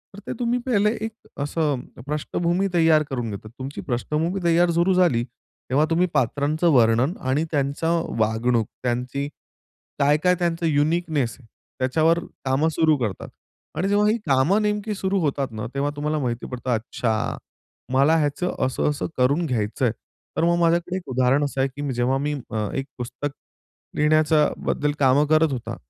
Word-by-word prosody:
तर - - -9
ते - - -2
तुम्ही 245 0 +1
पहिले 210 -4 +2
एक 225 - -4 0.3
असं 145 -3 0 0.3
पृष्ठभूमी 170 +5 0
तयार 160 -2 +4
करून 120 -4 -3
घेतात. 105 +2 -8
तुमची 135 +2 -5
पृष्ठभूमी 155 +8 -1
तयार 170 +1 +4
सुरू 170 +3 +2
झाली, 170 -11 +3 0.5
तेव्हा 140 +5 +3
तुम्ही 170 +2 +2
पात्रांचं 145 +7 +1
वर्णन 120 +4 +4 0.2
आणि 145 +5 +2
त्यांच्या 145 +2 0 0.3
वागणूक, 110 +1 +1 0.2
त्यांची 125 +3 -2 0.7
काय, 145 +1 +4
काय 180 0 +4
त्यांचं 170 -1 0
युनिकनेस 150 -3 +1
आहे, 120 - -19 0.3
त्याच्यावर 160 +6 +2 0.3
कामं 135 +4 +2
सुरू 160 -1 +3
करतात 110 -8 -4 0.5
आणि 185 +4 0
जेव्हा 205 +1 +3
ही 225 - +2
कामं 140 +10 +3
नेमकी 210 0 -1
सुरू 195 0 0
होतात 140 -2 0
ना, 110 0 -5
तेव्हा 140 +1 0
तुम्हाला 150 +1 -1
माहिती 120 -1 -2
पडतं, 125 0 -4
अच्छा 110 0 -2 0.6
मला 140 +5 +4
ह्याचं 150 +4 -1
असं 130 - 0
असं 145 - -2
करून 140 +7 +2
घ्यायचंय, 120 -2 0 0.5
तर - - +2
मग 170 0 +2
माझ्याकडे 170 +2 +1
एक 180 -7 -9
उदाहरण 130 +3 +2
असं 135 -1 -2
आहे, 135 - +2
की 145 -1 -3
जेव्हा 125 +2 +1
मी 145 +2 -1 0.2
अ, 110 -2 -1
एक 135 - -2
पुस्तक 135 +3 -4 0.6
लिहिण्याचा 155 0 +3 0.2
बद्दल 145 0 0
कामं 140 +2 +4
करत 155 0 +3
होता. 125 -3 -4
145 Hz, 160 wpm, -23 LUFS, 130-170 Hz, 0.7 s, तयार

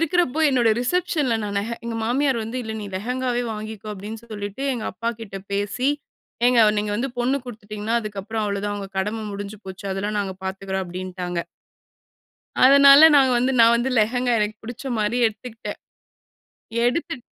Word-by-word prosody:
இருக்கறப்போ 330 -3 +1
என்னோட 245 -4 +3
ரிசப்ஷன்ல 295 -3 0
நான் 205 -1 -3
நெஹெ 225 +4 -3
எங்க 235 -1 -3
மாமியார் 265 +2 +1
வந்து, 225 +3 -5
"இல்ல 220 - -5
நீ - - -5
லெஹெங்காவே 245 +3 -1
வாங்கிக்கோ" 215 0 -7
அப்படீன்னு 210 +3 -7
சொல்லிட்டு 205 +4 -5
எங்க 235 -4 -4
அப்பா 230 +5 -3
கிட்ட 200 -3 -7 0.2
பேசி. 205 +6 0 0.6
"ஏங்க 245 -1 +5 0.2
நீங்க 210 0 -1
வந்து 260 +5 -2
பொண்ணு 255 +3 +1
குடுத்துட்டீங்கன்னா, 215 -1 -4
அதுக்கப்புறம் 215 +1 -4
அவ்வளோதான். 205 0 -2
உங்க 195 -1 -6
கடம 215 +3 -2
முடிஞ்சு 200 +1 -6
போச்சு. 190 +1 -9
அதெல்லாம் 205 +2 -2
நாங்க 195 -2 -4
பார்த்துக்கிறோம்" 190 0 -3
அப்டின்ட்டாங்க. 180 0 -5 1.3
அதனால 280 +3 +9
நாங்க 265 -2 +5
வந்து 255 +2 +1
நான் 230 +1 +7
வந்து, 240 +3 -1
லெகங்கா. 245 +3 +1
எனக்கு 210 0 -1
புடிச்ச 245 +3 -6
மாரி 210 +3 0
எடுத்துகிட்டேன். 225 +1 -6 1.1
எடுத்துட் 245 0 -1
220 Hz, 150 wpm, -23 LUFS, 205-250 Hz, 1.3 s, அதனால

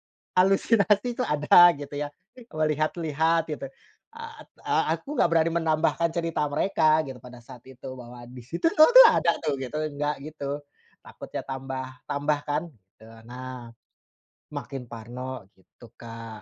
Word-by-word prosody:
berhalusinasi 200 +3 +2
tuh 250 - 0
ada, 150 +4 +6
gitu 145 0 -9
ya, 145 - -3 0.5
melihat-lihat, 155 +1 0
gitu. 145 - -5 0.5
Eee, 460 0 -9
at - - -15
eee, - - +1 0.2
aku - - -22
nggak - - +3
berani 165 0 +3
menambahkan 165 +1 +1
cerita 165 -3 -1
mereka, 155 -1 +2
gitu, 130 -2 -8
pada 125 -1 -12
saat 125 0 -12
itu, 130 +1 -11
bahwa, 120 0 -11
"Di 125 +1 -11
situ 170 - -2
lho, 310 - +7
tuh - - +12
ada, 170 - +3
tuh." 150 -3 0
Gitu, 130 +3 -5 0.2
nggak 145 0 -1
gitu. 145 -1 -5 0.4
Takutnya - - -8
tambah-tambah, 135 +2 -3
kan. 150 +2 0 0.4
Tu, 110 - -15 0.2
nah. 125 -1 -8 0.8
Makin 135 -2 -6
parno, 120 +1 -7
gitu, 95 +5 -19
Kak. 115 -2 -9
145 Hz, 145 wpm, -26 LUFS, 125-165 Hz, 0.8 s, tuh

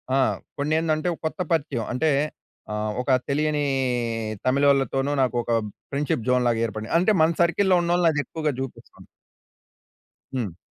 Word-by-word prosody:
ఆ! - - +3 0.4
కొన్ని 145 +2 0
ఏందంటే 155 0 0
ఒక - - -11
కొత్త 160 - -8
పరిచయం 140 -8 -1
అంటే 155 +5 +1 0.6
ఆహ్, 105 0 -2
ఒక 125 - -10 0.2
తెలియని 150 +1 +1 0.8
తమిళోళ్లతోను 135 0 +2
నాకు 125 -1 +1
ఒక 120 - -10 0.4
ఫ్రెండ్షిప్‌జోన్‌లాగా 125 -4 +1
ఏర్పడింది. 110 0 -5
అంటే 185 +5 +3
మన 160 +1 +5
సర్కిల్‌లో 185 +3 +3
ఉన్నోళ్ళని 175 0 +3
అది 145 - 0
ఎక్కువగా 155 -2 -2
చూపిస్తుంది. 135 -1 -8 1.3
హ్మ్. 105 -10 -3
140 Hz, 130 wpm, -24 LUFS, 125-160 Hz, 1.3 s, మన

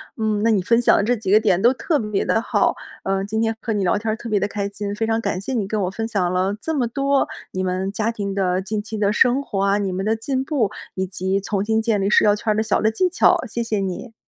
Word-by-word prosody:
嗯， 215 -2 -1
那 230 - +2
你 210 -4 +3
分 230 +6 +2
享 - - +5
的 - - +2
这 235 +4 +2
几 210 -3 -5
个 210 +3 +5
点 185 -3 +2
都 240 +4 +5
特 300 +3 0
别 210 -3 -1
地 - - +1
好， 230 - +1 0.3
呃， 195 0 -1
今 220 +2 -2
天 225 0 +1
和 225 - -2
你 205 -2 0
聊 180 - +2
天 220 +2 -3
儿 215 - 0
特 230 +1 -8
别 210 -2 +2
地 200 - 0
开 200 -1 -3
心。 205 0 -5
非 225 - -1
常 225 0 0
感 185 -4 -2
谢 265 - -4
你 215 -6 -1
跟 210 +1 -1
我 180 - 0
分 225 +3 -3
享 195 -6 0
了 185 +2 0
这 320 - -2
么 255 -6 0
多 275 +3 +1 0.2
你 185 - -2
们 185 +1 -1
家 215 +3 -1
庭 200 -3 -4
的 185 -1 0
近 205 +2 -3
期 220 +1 -6
的 205 -1 +2
生 250 +4 +3
活 200 -7 -3
啊， 200 +1 +2
你 200 -2 -1
们 190 +2 -3
的 220 +1 +2
进 260 +4 -2
步 265 -9 0 0.2
以 190 - -1
及 190 +1 -1
重 200 0 -1
新 220 +1 +1
建 220 -3 +1
立 195 - +1
社 - - +5
交 210 - +5
圈 215 +1 -1
儿 - - -4
的 215 - +1
小 220 - +1
的 220 - +2
技 365 +11 +1
巧， 370 - +3
谢 235 +1 -3
谢 220 -2 -1
你。 195 +5 -4
210 Hz, 315 characters per minute, -21 LUFS, 195-225 Hz, 0.3 s, 享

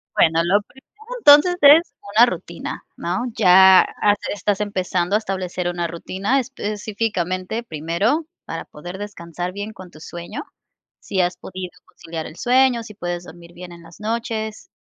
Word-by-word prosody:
Bueno, 165 0 +4
lo 200 +4 +3
primero 265 +6 -21 0.4
entonces 300 0 +7
es 290 +2 +7 0.2
una 235 - +8
rutina, - - -6
¿no? 245 - -2
Ya 190 -2 +8
has 205 0 +1 0.2
estás 205 +2 -1
empezando 185 -1 -1
a - - +6
establecer 185 -3 -3
una 175 -1 -2
rutina 190 +9 -1
específicamente 210 -4 -3
primero, 170 - -1 0.2
para 165 - -6
poder 175 +5 -9
descansar 180 -3 -6
bien 205 +2 -5
con 185 -2 -12
tu 155 - -16
sueño. 170 0 -7 0.6
¿Sí 190 - -3
has 180 0 +1
podido 185 -1 -7
conciliar 165 -1 -8
el 155 - -11
sueño?, 250 -1 +3
¿si 215 -1 -11
puedes 175 -3 -4
dormir 170 0 -13
bien 180 0 -10
en 170 -1 -13
las 165 +3 -16
noches? 220 - -4
190 Hz, 155 wpm, -21 LUFS, 175-220 Hz, 0.6 s, una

